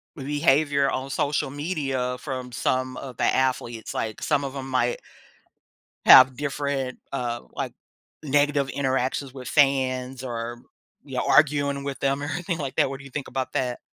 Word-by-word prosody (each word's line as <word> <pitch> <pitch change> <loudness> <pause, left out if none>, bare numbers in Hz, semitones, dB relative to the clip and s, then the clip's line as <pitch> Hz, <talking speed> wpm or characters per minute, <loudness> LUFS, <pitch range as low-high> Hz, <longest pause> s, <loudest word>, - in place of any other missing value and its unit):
behavior 140 0 +2
on 130 +1 -3
social 145 -1 0
media 135 -5 -2
from 130 -3 -5
some 130 +1 -1
of 130 -3 -8
the - - -1
athletes? 125 -3 0
Like, 110 -1 -3
some 145 -2 +1
of 135 0 -4
them 135 -1 -6
might 125 -2 +1 1.1
have 130 -1 +9
different, 140 -2 -2
uh, 120 -3 -2
like, - - -4 0.5
negative 145 -1 +2
interactions 130 0 -1
with 130 -2 -8
fans 130 -2 +2
or, 120 -1 -4 0.5
you - - -7
know, - - 0
arguing 140 -2 +3
with 140 -1 -4
them 140 +1 0
or - - -3
anything 170 +4 -3
like 140 -3 -4
that. - - +3
What 135 - -5
do 135 - -13
you 135 - -11
think 145 +1 -5
about 130 0 -3
that? 125 -4 -1
135 Hz, 165 wpm, -25 LUFS, 130-145 Hz, 1.1 s, have